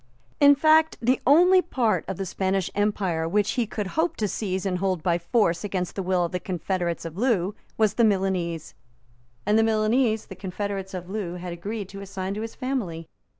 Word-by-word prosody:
In 285 Hz, 0 st, +7 dB
fact, 315 Hz, +2 st, +4 dB
the 250 Hz, +2 st, +1 dB
only 360 Hz, +6 st, +6 dB
part 220 Hz, -, 0 dB
of 190 Hz, -, -4 dB
the 195 Hz, -, -3 dB
Spanish 190 Hz, 0 st, -1 dB
empire 190 Hz, -6 st, 0 dB
which 205 Hz, +2 st, +1 dB
he 240 Hz, -4 st, 0 dB
could 210 Hz, 0 st, -3 dB
hope 320 Hz, -, 0 dB
to 215 Hz, -, -1 dB
seize 190 Hz, -2 st, -3 dB
and 180 Hz, -2 st, -1 dB
hold 185 Hz, -4 st, -1 dB
by 170 Hz, -1 st, +2 dB
force 170 Hz, -1 st, +1 dB
against 185 Hz, -3 st, -2 dB
the 195 Hz, -, -2 dB
will 180 Hz, -1 st, +1 dB
of 170 Hz, -, -5 dB
the 180 Hz, -, -2 dB
confederates 175 Hz, -1 st, -2 dB
of 165 Hz, +1 st, -7 dB
Loo 210 Hz, -6 st, +1 dB, 0.2 s
was 215 Hz, -2 st, +3 dB
the 235 Hz, -, +2 dB
Milanese; 185 Hz, -6 st, 0 dB, 0.7 s
and 210 Hz, +2 st, +3 dB
the -, -, +4 dB
Milanese 220 Hz, +1 st, +2 dB
the 190 Hz, -, -10 dB
confederates 190 Hz, +1 st, -4 dB
of 180 Hz, -1 st, -6 dB
Loo 190 Hz, -3 st, -4 dB
had 180 Hz, -1 st, -6 dB
agreed 200 Hz, +4 st, -5 dB
to 195 Hz, 0 st, -8 dB
assign 195 Hz, -1 st, -4 dB
to 210 Hz, -, -4 dB
his 225 Hz, 0 st, -6 dB
family. 200 Hz, -12 st, -3 dB
195 Hz, 195 wpm, -25 LUFS, 180-220 Hz, 0.7 s, In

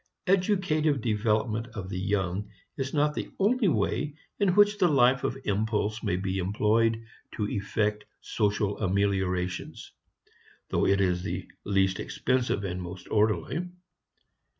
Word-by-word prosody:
Educative 180 Hz, -6 st, +2 dB
development 110 Hz, 0 st, 0 dB
of 95 Hz, -4 st, -5 dB
the 90 Hz, -, -3 dB
young 95 Hz, 0 st, -1 dB, 0.3 s
is 135 Hz, -1 st, -3 dB
not 150 Hz, 0 st, +2 dB
the -, -, -4 dB
only 220 Hz, +3 st, +2 dB
way 150 Hz, -2 st, 0 dB, 0.2 s
in 195 Hz, -3 st, +2 dB
which 205 Hz, 0 st, +5 dB
the 180 Hz, -, +5 dB
life 130 Hz, -3 st, +4 dB
of 130 Hz, -, -1 dB
impulse 105 Hz, +1 st, -1 dB
may 90 Hz, -, 0 dB
be 95 Hz, +1 st, -2 dB
employed 110 Hz, +4 st, +1 dB, 0.3 s
to 105 Hz, -2 st, -2 dB
effect 105 Hz, +1 st, -1 dB
social 105 Hz, -1 st, -1 dB
ameliorations, 95 Hz, -2 st, -1 dB, 0.8 s
though -, -, +1 dB
it 100 Hz, 0 st, +3 dB
is 90 Hz, -2 st, +1 dB
the -, -, -4 dB, 0.2 s
least 95 Hz, -2 st, +1 dB
expensive 125 Hz, -5 st, 0 dB
and 90 Hz, -1 st, -3 dB
most 90 Hz, +1 st, -8 dB
orderly. 110 Hz, -, +1 dB
105 Hz, 130 wpm, -28 LUFS, 95-135 Hz, 0.8 s, which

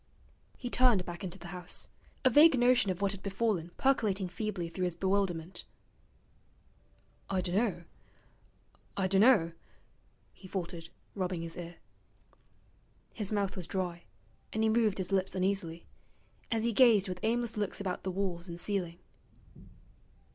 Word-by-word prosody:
He 245 Hz, -2 st, -5 dB
turned 240 Hz, -8 st, +4 dB
back 175 Hz, +3 st, -7 dB
into 190 Hz, 0 st, -4 dB
the 175 Hz, -2 st, -10 dB
house, 180 Hz, -1 st, -4 dB, 0.4 s
a 260 Hz, -, +7 dB
vague 295 Hz, +2 st, +7 dB
notion 245 Hz, -3 st, +4 dB
of 185 Hz, +1 st, -2 dB
what 200 Hz, -, +3 dB
had 195 Hz, -1 st, -6 dB
befallen 200 Hz, -4 st, -1 dB
percolating 210 Hz, -8 st, +2 dB
feebly 180 Hz, -1 st, -3 dB
through 180 Hz, +2 st, -2 dB
his 175 Hz, -2 st, -2 dB
bewilderment. 190 Hz, -3 st, -1 dB, 1.7 s
'I 190 Hz, -2 st, +1 dB
dunno 180 Hz, 0 st, 0 dB, 1.1 s
I 190 Hz, -, +2 dB
dunno,' 195 Hz, -3 st, +5 dB, 0.8 s
he 190 Hz, -, -13 dB
faltered, 170 Hz, -3 st, -5 dB, 0.2 s
rubbing 180 Hz, -3 st, -2 dB
his 165 Hz, 0 st, -6 dB
ear. 175 Hz, 0 st, -7 dB, 1.4 s
His 210 Hz, -3 st, -2 dB
mouth 200 Hz, -2 st, 0 dB
was 180 Hz, -4 st, -5 dB
dry, 175 Hz, -2 st, -3 dB, 0.5 s
and 220 Hz, -, 0 dB
he 220 Hz, -, +4 dB
moved 220 Hz, -2 st, +2 dB
his 190 Hz, 0 st, -3 dB
lips 190 Hz, -1 st, +1 dB
uneasily, 185 Hz, -3 st, -1 dB, 0.7 s
as 225 Hz, -1 st, +1 dB
he 235 Hz, 0 st, +1 dB
gazed 220 Hz, -5 st, +6 dB
with 180 Hz, -1 st, -4 dB
aimless 235 Hz, +1 st, 0 dB
looks 205 Hz, -2 st, -2 dB
about 190 Hz, -3 st, -3 dB
the 190 Hz, -, -3 dB
walls 185 Hz, -2 st, -2 dB
and 170 Hz, 0 st, -6 dB
ceiling. 180 Hz, -4 st, -2 dB
190 Hz, 140 wpm, -31 LUFS, 175-215 Hz, 1.7 s, a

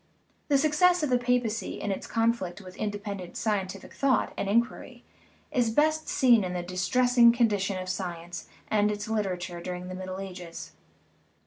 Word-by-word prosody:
The 285 Hz, -, +4 dB
success 315 Hz, +4 st, +3 dB
of 290 Hz, -, 0 dB
the 250 Hz, -, +4 dB
papacy 240 Hz, -2 st, 0 dB
in 205 Hz, -, -2 dB
its 195 Hz, -, -4 dB
conflict 225 Hz, -6 st, 0 dB
with 185 Hz, -2 st, -11 dB
independent 205 Hz, -3 st, -5 dB
scientific 195 Hz, -3 st, -2 dB
thought 275 Hz, -2 st, +1 dB
and 195 Hz, -, -2 dB
in 235 Hz, +3 st, +4 dB
quiry -, -, -12 dB, 0.5 s
is 245 Hz, -6 st, +2 dB
best 310 Hz, +6 st, +2 dB
seen 240 Hz, -6 st, +5 dB
in 180 Hz, -1 st, -3 dB
the 175 Hz, -1 st, -2 dB
distressing 235 Hz, +7 st, +4 dB
condition 210 Hz, -5 st, +1 dB
of 185 Hz, -, -3 dB
sci 185 Hz, -2 st, -3 dB
ence 175 Hz, +1 st, -8 dB, 0.2 s
and 210 Hz, -1 st, +2 dB
its 210 Hz, 0 st, -3 dB
literature 185 Hz, -5 st, -2 dB
during 180 Hz, +1 st, -5 dB
the -, -, -5 dB
Middle 185 Hz, 0 st, -6 dB
Ages. 180 Hz, -3 st, -8 dB
205 Hz, 170 wpm, -28 LUFS, 185-245 Hz, 0.5 s, seen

